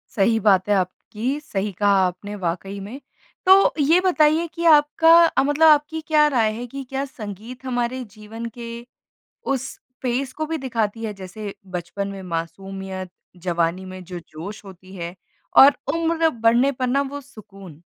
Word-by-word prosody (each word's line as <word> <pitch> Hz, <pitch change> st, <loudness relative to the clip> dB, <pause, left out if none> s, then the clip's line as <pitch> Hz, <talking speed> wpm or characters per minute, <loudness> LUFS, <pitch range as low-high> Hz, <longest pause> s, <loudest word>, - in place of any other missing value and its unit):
सही 225 Hz, +2 st, +3 dB
बात 195 Hz, -2 st, +3 dB
है 205 Hz, -, +4 dB
आप 185 Hz, -2 st, +1 dB, 0.2 s
की। 250 Hz, +7 st, -2 dB
सही 210 Hz, -9 st, -3 dB
कहा 200 Hz, +2 st, +2 dB
आपने 195 Hz, +3 st, -7 dB
वाक़ई 195 Hz, +1 st, -4 dB
में। 210 Hz, +8 st, -8 dB, 0.5 s
तो 380 Hz, +1 st, +6 dB
ये 310 Hz, +5 st, +4 dB
बताइए 330 Hz, -3 st, +3 dB
कि 340 Hz, +1 st, -4 dB
आपका 310 Hz, +1 st, +5 dB
अ, 330 Hz, -, +2 dB
मतलब 290 Hz, +3 st, +4 dB
आपकी 305 Hz, +1 st, +3 dB
क्या 300 Hz, -1 st, +5 dB
राय 235 Hz, -7 st, +2 dB
है 235 Hz, +3 st, -6 dB
कि 275 Hz, +3 st, -7 dB
क्या 270 Hz, +1 st, -2 dB
संगीत 235 Hz, 0 st, -9 dB
हमारे 250 Hz, 0 st, -2 dB
जीवन 220 Hz, +2 st, -8 dB
के 235 Hz, -1 st, -7 dB, 0.9 s
उस 265 Hz, 0 st, -4 dB, 0.3 s
पेस 255 Hz, +1 st, -1 dB
को 310 Hz, +3 st, -4 dB
भी 320 Hz, +1 st, -3 dB
दिखाती 230 Hz, -4 st, -2 dB
है, 215 Hz, -, -3 dB
जैसे 195 Hz, +2 st, -8 dB, 0.2 s
बचपन 195 Hz, +3 st, -4 dB
में 195 Hz, -1 st, -7 dB
मासूमियत, 185 Hz, +2 st, -5 dB, 0.4 s
जवानी 170 Hz, +1 st, 0 dB
में 185 Hz, 0 st, -9 dB
जो 180 Hz, 0 st, -7 dB
जोश 195 Hz, +8 st, -9 dB
होती 190 Hz, -1 st, -13 dB
है 170 Hz, 0 st, -6 dB, 0.4 s
और 280 Hz, +1 st, +9 dB, 0.2 s
उम्र 330 Hz, 0 st, +1 dB
बढ़ने 235 Hz, +2 st, +3 dB
पर 255 Hz, -1 st, -2 dB
ना 260 Hz, +3 st, +2 dB
वो 285 Hz, 0 st, -6 dB
सुकून? 195 Hz, -, -14 dB
225 Hz, 165 wpm, -22 LUFS, 195-280 Hz, 0.9 s, और